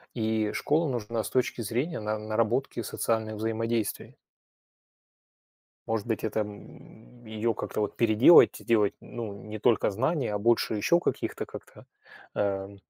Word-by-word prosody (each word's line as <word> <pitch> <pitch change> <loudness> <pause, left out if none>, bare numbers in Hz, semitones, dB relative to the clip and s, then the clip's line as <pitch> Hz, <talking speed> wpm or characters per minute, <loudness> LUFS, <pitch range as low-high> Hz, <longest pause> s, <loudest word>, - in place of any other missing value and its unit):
И 110 -2 0
школа 160 +2 +1
нужна 115 -2 -2
с - - -5
точки 125 -1 0
зрения 125 - -2
на 105 0 -2
наработки 115 +4 -1
социальных 110 -1 -2
взаимодействий. 115 0 -2 1.7
Может 110 -2 -2
быть, 115 -2 -2
это, 110 0 -1
м, 110 +3 -10
ее 110 +1 -1
как-то - - -4
вот 105 - -2
переделать, 115 +8 +6
сделать, 105 -3 +1
ну, 115 -3 -6
не 105 0 -7
только 110 0 +3
знания, 130 - -1
а 105 - -1
больше 115 +1 +2
еще 170 - +3
каких-то, - - -2
как-то, - - -12 0.5
э, 100 0 -2
110 Hz, 135 wpm, -28 LUFS, 105-120 Hz, 1.7 s, переделать